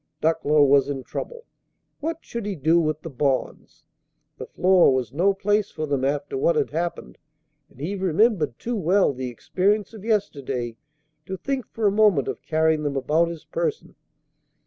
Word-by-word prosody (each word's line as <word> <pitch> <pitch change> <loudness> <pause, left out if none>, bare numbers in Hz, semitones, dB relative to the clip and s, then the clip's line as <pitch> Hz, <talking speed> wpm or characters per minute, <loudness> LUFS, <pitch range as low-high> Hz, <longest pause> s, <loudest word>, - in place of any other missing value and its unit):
Ducklow 155 -2 +3
was 140 0 +4
in 135 -2 -4
trouble. 480 - -7 0.5
What 325 +2 -3
should 235 -3 -6
he 200 - -2
do 160 +3 +3
with 155 -2 -1
the 165 - -6
bonds? 140 +3 -2 0.5
The - - -6
floor 185 -3 +4
was 130 -2 -1
no 180 +7 +3
place 205 +1 0
for 155 - -4
them 140 -3 -1
after 145 - -1
what - - +2
had 445 -2 0
happened; 175 +1 -4 0.5
and 130 - -21
he 160 +8 -3
remembered 190 - +1
too 240 +1 -3
well 190 -3 +2
the 130 -1 -4
experience 195 - 0
of 215 -3 -10
yesterday 140 - -2 0.5
to 190 -1 -4
think 270 +1 -3
for 225 - -3
a 200 - +5
moment 205 -9 +3
of - - -4
carrying 160 -1 +1
them 145 -2 -2
about 155 +5 +2
his 165 -2 -8
person. 475 -2 -3
170 Hz, 170 wpm, -24 LUFS, 145-210 Hz, 0.5 s, a